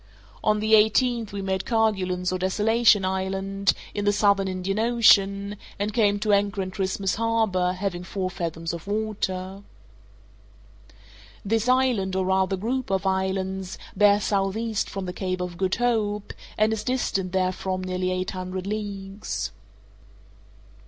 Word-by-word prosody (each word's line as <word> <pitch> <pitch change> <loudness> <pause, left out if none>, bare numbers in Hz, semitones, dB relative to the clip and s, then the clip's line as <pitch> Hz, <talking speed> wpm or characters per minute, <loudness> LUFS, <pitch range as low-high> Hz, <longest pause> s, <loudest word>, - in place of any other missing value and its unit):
On 215 0 +2
the 220 +1 +1
eighteenth 225 +1 +3
we 200 -1 -4
made 190 -1 -1
Kerguelen's 190 -6 0
or 185 - -2
Desolation 210 +2 +3
Island, 195 +1 0 0.2
in 205 - -2
the 205 - +3
Southern 200 -1 +3
Indian 190 +2 -2
Ocean, 205 -3 +4 0.2
and 205 +1 -2
came 205 -3 +3
to 210 -1 +2
anchor 200 0 +1
in 185 - -6
Christmas 190 0 -1
Harbour, 220 -6 +1
having 185 -2 -3
four 185 0 -3
fathoms 165 -2 -4
of 170 +2 -7
water. 195 -3 -3 1.8
This 225 +3 +1
island, 250 -8 +2
or 190 0 +1
rather 190 0 +1
group 245 +5 -2
of 195 0 0
islands, 190 0 -1 0.2
bears 205 0 +4
southeast 205 +2 -1
from 195 -1 -5
the 180 - -4
Cape 185 0 -3
of 180 -1 -4
Good 190 +1 0
Hope, 215 -4 0 0.2
and 215 +1 +3
is 220 - -3
distant 195 -7 -1
therefrom 185 0 -1
nearly 185 0 -1
eight 185 0 -2
hundred 185 0 -5
leagues. 200 - -4
195 Hz, 140 wpm, -25 LUFS, 185-215 Hz, 1.8 s, Ocean